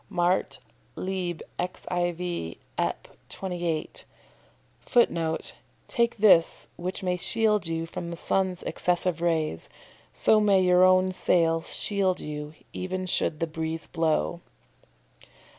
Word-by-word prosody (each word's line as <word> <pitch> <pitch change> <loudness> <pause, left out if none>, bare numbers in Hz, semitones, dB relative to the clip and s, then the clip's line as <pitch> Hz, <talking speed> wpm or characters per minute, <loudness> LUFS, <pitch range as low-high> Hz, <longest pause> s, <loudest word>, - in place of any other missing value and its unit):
Mart., 180 -1 +1 0.4
lib. 185 -3 -3 0.2
xiv., 175 - -2 0.2
Ep. - - -1 0.2
28. 175 -4 -3 0.7
[Footnote: 165 -10 +1 0.3
"Take 235 -2 +1
this, 195 -6 +4
which 180 +2 -4
may 180 -1 +1
shield 210 +1 +1
you 165 0 -2
from 170 +1 -6
the 170 - -6
sun's 185 0 0
excessive 175 -1 0
rays. 160 - 0 0.4
So 215 - +4
may 200 -2 +4
your 180 0 +5
own 185 0 +5
sail 165 -3 +2
shield 190 0 0
you, 150 0 -6 0.2
even 185 0 -3
should 165 -3 +1
the 165 - +1
breeze 160 0 -3
blow." 165 +1 0
175 Hz, 110 wpm, -27 LUFS, 165-185 Hz, 0.7 s, your